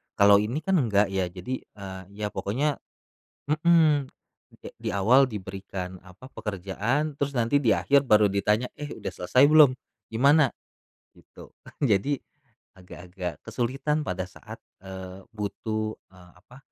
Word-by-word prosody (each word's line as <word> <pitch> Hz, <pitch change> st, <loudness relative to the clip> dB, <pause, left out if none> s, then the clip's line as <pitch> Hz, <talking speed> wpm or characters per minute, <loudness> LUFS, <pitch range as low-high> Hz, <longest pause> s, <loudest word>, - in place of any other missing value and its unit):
Kalau 100 Hz, 0 st, +6 dB
ini 115 Hz, +8 st, -2 dB
kan 190 Hz, +2 st, +1 dB
enggak 105 Hz, -5 st, +2 dB
ya, 95 Hz, -2 st, 0 dB
jadi, 95 Hz, +8 st, -5 dB, 0.2 s
eee, 95 Hz, -2 st, -8 dB
ya 105 Hz, 0 st, -3 dB
pokoknya 140 Hz, +8 st, -1 dB, 0.7 s
mhm, 155 Hz, 0 st, 0 dB, 0.4 s
eee, -, -, -27 dB
kek -, -, -8 dB
di -, -, -4 dB
awal 125 Hz, +8 st, +5 dB
diberikan 95 Hz, -3 st, -7 dB
apa, 100 Hz, +9 st, -14 dB
pekerjaan, 110 Hz, -, -3 dB
terus 140 Hz, 0 st, -2 dB
nanti 120 Hz, +4 st, +2 dB
di 120 Hz, -6 st, +3 dB
akhir 140 Hz, -1 st, +2 dB
baru 105 Hz, -2 st, +5 dB
ditanya, 105 Hz, +5 st, 0 dB
"Eh 145 Hz, 0 st, -6 dB
udah -, -, -5 dB
selesai 125 Hz, +9 st, +2 dB
belum? 150 Hz, -4 st, +7 dB, 0.3 s
Gimana?" 140 Hz, +4 st, +3 dB, 0.6 s
gitu. -, -, -15 dB, 0.3 s
Jadi 130 Hz, +3 st, +1 dB, 0.5 s
agak-agak 90 Hz, -2 st, -8 dB
kesulitan 135 Hz, +5 st, -1 dB
pada 95 Hz, -8 st, -3 dB
saat, 90 Hz, -, -12 dB, 0.2 s
eee, 95 Hz, 0 st, -9 dB
butuh, 110 Hz, 0 st, -4 dB, 0.2 s
eee, 90 Hz, -1 st, -18 dB
apa, 125 Hz, +6 st, -17 dB
105 Hz, 135 wpm, -26 LUFS, 95-135 Hz, 0.7 s, belum